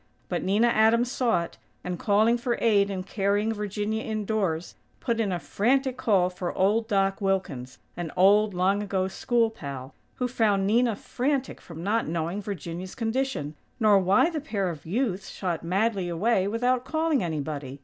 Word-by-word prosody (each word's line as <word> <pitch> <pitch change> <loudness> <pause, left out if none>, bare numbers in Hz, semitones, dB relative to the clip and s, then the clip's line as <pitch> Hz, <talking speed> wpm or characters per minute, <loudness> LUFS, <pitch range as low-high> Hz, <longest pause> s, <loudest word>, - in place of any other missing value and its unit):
But - - -1
Nina 205 +5 +3
Adams 230 +2 +3
saw 235 -11 +1
it; 170 - -11 0.2
and, 180 -1 -4
calling 215 +3 +3
for 240 0 -1
aid 205 -3 +3
in 190 -2 -3
carrying 205 +3 0
Virginia 210 +1 -2
indoors, 210 -7 -2 0.3
put 230 -1 -1
in 210 -4 0
a 180 - 0
frantic 260 +9 0
call 190 -7 +2
for 180 -1 -5
old 215 +4 +2
Doc 195 -2 +1
Wilkins, 170 -11 -2 0.2
an 170 -3 -5
old, 205 +2 +5
long 190 +3 +2
ago 190 -2 -1
school 230 +3 +1
pal, 140 - -8 0.2
who 250 - -1
found 210 -6 +1
Nina 230 +2 +2
frantic 265 +5 -2
from 165 -1 -9
not 220 +4 0
knowing 170 +5 -2
Virginia's 185 -2 -6
condition, 230 - -2 0.3
nor 210 -3 +5
why 195 - +3
the 310 -3 -3
pair 200 -11 -2
of 160 -1 -10
youths 200 -1 -1
shot 175 -4 -3
madly 190 +1 0
away 190 +3 +1
without 245 +4 +1
calling 315 - 0
anybody. 145 -4 -4
205 Hz, 165 wpm, -26 LUFS, 180-230 Hz, 0.3 s, old